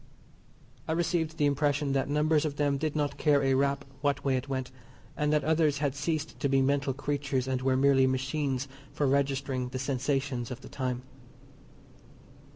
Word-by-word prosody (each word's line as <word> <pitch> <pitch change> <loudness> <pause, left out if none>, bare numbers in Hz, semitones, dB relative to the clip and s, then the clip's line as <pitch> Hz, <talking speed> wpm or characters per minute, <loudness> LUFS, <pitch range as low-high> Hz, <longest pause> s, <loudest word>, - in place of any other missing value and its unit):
I 160 - 0
received 165 -1 0
the 145 - +2
impression 145 0 +1
that 135 0 0
numbers 150 +1 +2
of 150 -2 -2
them 145 -1 +1
did 155 0 -2
not 145 -1 -1
care 145 -2 +3
a 135 0 +3
rap 140 +1 +1 0.2
what 145 -1 0
way 135 -1 +2
it 130 +2 -3
went; 130 -2 -3 0.4
and 150 0 0
that 150 -1 +2
others 155 -2 +2
had 140 -2 0
ceased 155 +2 -3
to 140 - 0
be 135 0 +3
mental 140 +1 +1
creatures 140 -2 -1
and 130 -1 -1
were 130 0 +2
merely 135 -1 +4
machines 135 0 -1 0.2
for 145 - -1
registering 135 -2 0
the 130 - -4
sensations 135 -1 -1
of 125 - -7
the - - -11
time. 125 -2 -3
140 Hz, 175 wpm, -29 LUFS, 135-150 Hz, 0.4 s, merely